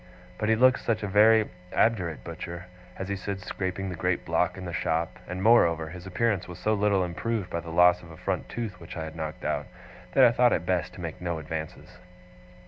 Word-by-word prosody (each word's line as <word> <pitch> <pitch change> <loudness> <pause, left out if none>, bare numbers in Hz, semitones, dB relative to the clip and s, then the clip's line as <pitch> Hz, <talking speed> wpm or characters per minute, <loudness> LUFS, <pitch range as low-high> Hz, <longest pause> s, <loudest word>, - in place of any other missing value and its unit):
But 110 - 0
he 110 - +5
looked 130 +3 +5
such 110 -2 -1
a - - -1
very 110 +2 +5 0.2
obdurate 90 -9 +1
butcher 85 +1 -7 0.3
as 95 - -4
he 100 - -2
stood 100 0 -4
scraping 95 +1 -4
the 90 - -4
great - - -1
block - - +1
in 95 - -7
the 85 - -5
shop, 80 0 -1
and 90 +1 -4
moreover, 85 -8 +4
his 90 +2 -9
appearance 100 0 0
was 90 -2 -8
so 110 +4 0
little 100 -2 +2
improved 105 +4 -3
by 85 - -1
the 85 0 -8
loss 90 +2 +5
of 85 - -13
a 80 - -11
front 95 0 -3
tooth 115 -4 -5
which 85 0 -9
I 80 - -3
had 80 0 -7
knocked 80 -1 -5
out, - - -1 0.5
that 135 - +6
I 120 - +8
thought 120 0 +4
it 85 - -1
best 90 -1 -1
to 90 - -9
make 80 -1 -6
no 85 -2 -2
advances. 80 0 -7
90 Hz, 220 wpm, -27 LUFS, 85-105 Hz, 0.5 s, I